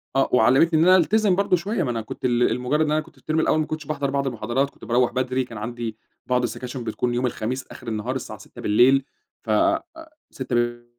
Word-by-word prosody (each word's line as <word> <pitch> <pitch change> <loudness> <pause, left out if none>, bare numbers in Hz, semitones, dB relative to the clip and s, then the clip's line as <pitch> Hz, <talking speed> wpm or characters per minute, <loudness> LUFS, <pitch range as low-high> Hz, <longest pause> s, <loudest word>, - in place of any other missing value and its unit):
آه 135 - +2
وعلّمتني 135 +7 +4
إن 165 - +4
أنا 185 - +8
ألتزم 200 +2 +3
برضه 200 -1 +2
شويّة، 190 +3 -2
ما 125 - -1
أنا 115 -1 -2
كنت 110 - -7
ل 120 -2 +2
لمجرد 145 +6 0
إن 150 - -1
أنا 155 - +2
كنت - - -10
في - - -23
الترم 155 +1 -1
الأول 155 - +2
ما 155 - +1
كنتش 155 -2 -5
باحضر 140 -2 -2
بعض 140 0 0
المحاضرات، 120 +3 -1
كنت - - -15
باروّح 120 +1 +2
بدري، 130 0 0
كان 115 -3 -10
عندي 115 0 -5 0.3
بعض 125 -1 +1
السكاشن 125 0 -4
بتكون 120 +2 -2
يوم 125 +1 0
الخميس 125 +2 -3
آخر - - -12
النهار 115 +4 -3
الساعة 110 -5 -6
18:00 - - -13
بالليل 130 +6 +4 0.4
ف 110 - -3 0.8
18:00 130 -2 -4
ب 120 0 -1
130 Hz, 225 wpm, -23 LUFS, 120-155 Hz, 0.8 s, أنا